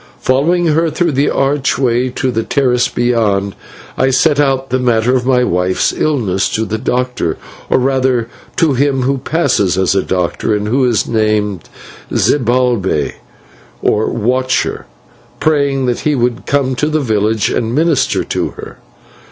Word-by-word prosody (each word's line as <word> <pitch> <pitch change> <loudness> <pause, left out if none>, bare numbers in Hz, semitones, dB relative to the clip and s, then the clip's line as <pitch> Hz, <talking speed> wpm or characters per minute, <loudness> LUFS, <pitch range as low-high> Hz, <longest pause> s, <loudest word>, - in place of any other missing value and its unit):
Following 165 +7 +1
her 165 +1 +2
through 170 +1 0
the 140 +1 +1
archway 130 -3 0
to 130 +1 -2
the 115 -1 -1
terrace 125 -1 +1
beyond, 105 -5 0 0.5
I 130 - +3
set 140 +3 +2
out 135 -2 0
the 130 - +1
matter 120 0 +2
of 125 -1 -1
my 125 -2 +3
wife's 90 -3 0
illness 110 -12 0
to 110 - -1
the 110 0 -3
doctor 125 +1 -1 0.3
or - - +3
rather 130 -2 +1 0.3
to 160 -4 +2
him 135 0 +1
who 135 +1 0
passes 125 - 0
as 95 -1 +2
a 95 - +2
doctor, 90 +3 -1
and 105 0 -2
who 130 +4 +2
is 120 -4 +1
named 105 -4 -1 0.4
Zibalbay, 120 - +1 0.7
or 105 +1 +1
Watcher 125 - -1 0.5
praying 140 -3 +1
that 125 -1 -1
he 150 -1 0
would 120 -1 -1
come 140 -2 +1
to 150 - 0
the 155 0 0
village 110 -3 0
and 115 +1 -1
minister 155 -4 +1
to - - -2
her. - - -10
125 Hz, 150 wpm, -14 LUFS, 110-135 Hz, 0.7 s, I